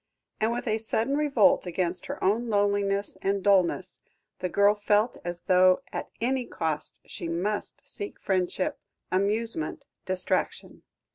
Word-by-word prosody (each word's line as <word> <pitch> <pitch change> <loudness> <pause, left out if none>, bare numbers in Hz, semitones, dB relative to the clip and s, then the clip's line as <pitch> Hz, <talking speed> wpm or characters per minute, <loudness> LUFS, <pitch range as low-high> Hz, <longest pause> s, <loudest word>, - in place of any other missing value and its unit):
And 220 +1 +2
with 240 +1 -3
a 220 0 +1
sudden 225 +4 0
revolt 285 -5 +3
against 175 0 -1
her - - -5
own 225 +5 +1
loneliness 200 -1 +1
and 195 0 0
dullness, 195 -4 +2 0.4
the 180 - -2
girl 200 +3 +4
felt 210 +2 +1
as 175 0 -5
though 185 +4 +4
at - - -4
any 250 +1 0
cost 160 -2 -3
she 170 - -6
must 190 +5 -2
seek 205 - -6
friendship, 185 -1 -1 0.3
amusement, 200 -2 -1 0.2
distraction. 185 -1 -1
200 Hz, 135 wpm, -27 LUFS, 185-220 Hz, 0.4 s, girl